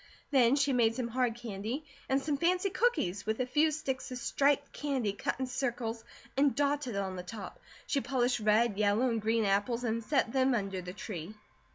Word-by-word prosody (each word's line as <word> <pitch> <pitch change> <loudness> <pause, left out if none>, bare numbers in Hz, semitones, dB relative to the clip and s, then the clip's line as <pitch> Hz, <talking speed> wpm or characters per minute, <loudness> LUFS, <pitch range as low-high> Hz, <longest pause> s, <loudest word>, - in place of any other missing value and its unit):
Then 255 -2 +5
she 280 -1 +2
made 230 -2 +3
some 245 -2 -2
hard 245 -1 0
candy, 235 +5 -5 0.2
and 265 +1 +3
some 290 +1 -1
fancy 360 +6 +1
cookies 205 - +1
with 220 +2 0
a 255 - +1
few 300 +5 +3
sticks 275 -4 -3
of 255 - -4
striped 280 +3 +1
candy 265 -8 -1
cut 205 - -3
in 260 - 0
circles 240 -3 -3 0.3
and 275 0 +3
dotted 285 -4 0
on 195 -1 -2
the - - -3
top. 195 +2 -8 0.3
She 280 - 0
polished 245 0 +1
red, 215 0 +2
yellow, 210 +4 +3
and 225 -1 -1
green 225 +1 +1
apples 205 +5 +1
and 230 -1 -1
set 260 -1 +1
them 260 0 +3
under 195 -4 -2
the 180 0 -7
tree. 190 -1 -7
240 Hz, 195 wpm, -31 LUFS, 215-275 Hz, 0.3 s, Then